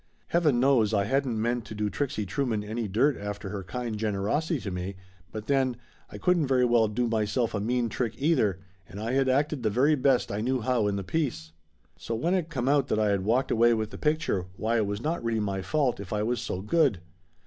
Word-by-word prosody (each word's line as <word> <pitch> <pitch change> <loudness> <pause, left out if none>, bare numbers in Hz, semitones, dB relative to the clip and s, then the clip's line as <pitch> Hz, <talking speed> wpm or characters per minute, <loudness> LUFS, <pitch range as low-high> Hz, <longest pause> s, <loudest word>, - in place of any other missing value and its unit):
Heaven 155 -8 +3
knows 120 -5 +3
I 100 - +2
hadn't 130 0 0
meant 120 +1 0
to 110 - -8
do 105 0 -1
Trixie 110 -2 -2
Trueman 120 -2 -1
any 110 +2 -3
dirt 125 +9 +2
after 105 -1 -5
all 105 - -4
her 95 - -6
kind 120 +3 -4
generosity 110 - 0
to 100 - -4
me, 90 +2 -4 0.4
but 110 -1 -6
then, 130 -2 +1 0.3
I - - -8
couldn't 175 -5 +2
very 130 -1 +3
well 120 -2 +4
do 120 +3 -1
myself 110 +1 0
a 105 - -1
mean 120 +3 0
trick 115 0 -2
either, 130 - +2 0.3
and 95 +4 -8
I 110 +2 -2
had 135 0 +2
acted 145 +1 +1
the 110 - +1
very 130 +8 +3
best 135 -3 +2
I 100 +1 -2
knew 130 +2 0
how 120 -2 +1
in 100 - 0
the 100 - -3
piece. 95 - -2 0.5
So 115 - -3
when 165 +11 0
it 175 -4 0
come 130 -6 -2
out 140 -1 +3
that - - 0
I 105 -1 +2
had 100 -2 +1
walked 120 +6 +1
away 120 0 +4
with 110 -1 -3
the - - -8
picture, 150 - 0
why 115 +2 0
it 110 -3 +1
was 100 +1 -3
not 155 0 -2
really 115 -1 0
my 100 -2 -2
fault 140 +1 0
if 100 -2 -8
I 105 0 0
was 120 +2 -1
so 90 - -4
good. 135 - +2
115 Hz, 235 wpm, -27 LUFS, 105-135 Hz, 0.5 s, well